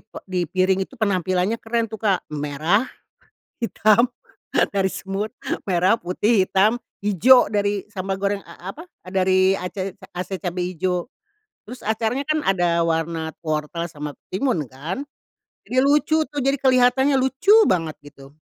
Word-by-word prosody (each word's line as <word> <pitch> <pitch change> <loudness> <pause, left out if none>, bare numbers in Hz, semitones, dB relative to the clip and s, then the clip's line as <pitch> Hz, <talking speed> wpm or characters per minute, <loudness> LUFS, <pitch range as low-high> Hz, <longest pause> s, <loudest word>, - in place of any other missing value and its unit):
pe 215 - -11
di 185 -1 -2
piring 185 +2 +2
itu 265 - -18
penampilannya 185 0 +1
keren 230 0 -1
tuh 220 -1 -9
Kak. 200 -4 +1
Merah, 150 - 0 0.7
hitam, 230 0 +3 0.6
dari 195 -1 +1
semut, 195 +3 -4 0.3
merah, 185 +3 +3
putih, 190 +3 +1
hitam, 210 +5 +3 0.3
hijau 220 +6 +5
dari 205 -1 0
sambal 195 -2 -3
goreng, 200 0 -1
a 180 - -10
apa, 325 - -11 0.2
dari 190 0 +3
ace 185 +1 -5 0.2
ase 185 +2 -4
cabe 180 -1 -3
hijau, 180 +2 -2 0.6
terus 250 +3 -10
acarnya 225 +5 -1
kan 310 +2 0
ada 175 -3 +2
warna 165 0 -1
wortel 155 +1 -2
sama 150 -2 -6 0.2
timun 190 - 0
kan? 155 - -5 0.6
Jadi 255 - -4
lucu 295 +3 +3
tuh. 290 0 -4
Jadi 275 +1 +2
kelihatannya 260 +1 +4
lucu 265 +9 +1
banget, 165 -4 0
gitu. 135 -1 -14
195 Hz, 140 wpm, -22 LUFS, 180-230 Hz, 0.7 s, hijau